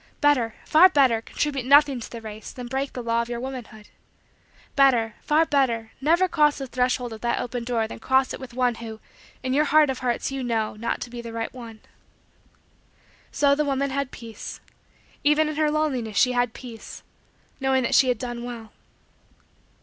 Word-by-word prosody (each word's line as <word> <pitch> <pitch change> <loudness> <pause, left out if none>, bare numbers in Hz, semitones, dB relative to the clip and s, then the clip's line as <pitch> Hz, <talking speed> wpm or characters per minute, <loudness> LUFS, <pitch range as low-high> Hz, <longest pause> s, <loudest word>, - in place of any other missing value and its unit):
Better, 255 -7 +2
far 340 +4 +7
better, 260 -8 +3
contribute 275 +2 -2
nothing 280 0 +5
to 230 - -8
the 235 - -8
race 215 -1 -8
than 250 - -8
break 265 +3 -3
the 250 - -5
law 230 0 +1
of 235 - -5
your 240 -1 -3
womanhood. 240 -4 -8 0.9
Better, 245 -5 +4
far 310 +2 +3
better, 240 -7 0
never 340 +6 +3
cross 300 -4 +3
the 270 - -4
threshold 250 -1 -1
of 220 - -10
that 235 - 0
open 245 0 -4
door 235 -2 -1
than - - -9
cross 260 +2 +2
it - - -6
with 260 -2 -9
one 250 -1 +2
who, 220 -1 -7 0.4
in 260 0 -1
your 300 +3 +3
heart 300 -1 +4
of 260 - -5
hearts 245 0 -1
you 270 -1 -3
know, 225 -3 -1
to 235 +2 -3
be 245 - -8
not - - -7
the 230 - -7
right 225 0 -4
one." 230 -4 -10 1.5
So 285 -1 +3
the 300 +2 +1
woman 280 -1 -1
had 280 -1 -2
peace. 230 -4 -9 0.6
Even 300 +1 +3
in 305 - -3
her 310 -1 +2
loneliness, 265 -8 -1
she 250 - +4
had 245 -2 0
peace 235 -4 -10 0.6
knowing 265 -1 +1
that 235 - -1
she 265 - +5
had 250 -2 +1
done 240 0 -5
well. 230 -3 -8
250 Hz, 190 wpm, -24 LUFS, 230-280 Hz, 1.5 s, far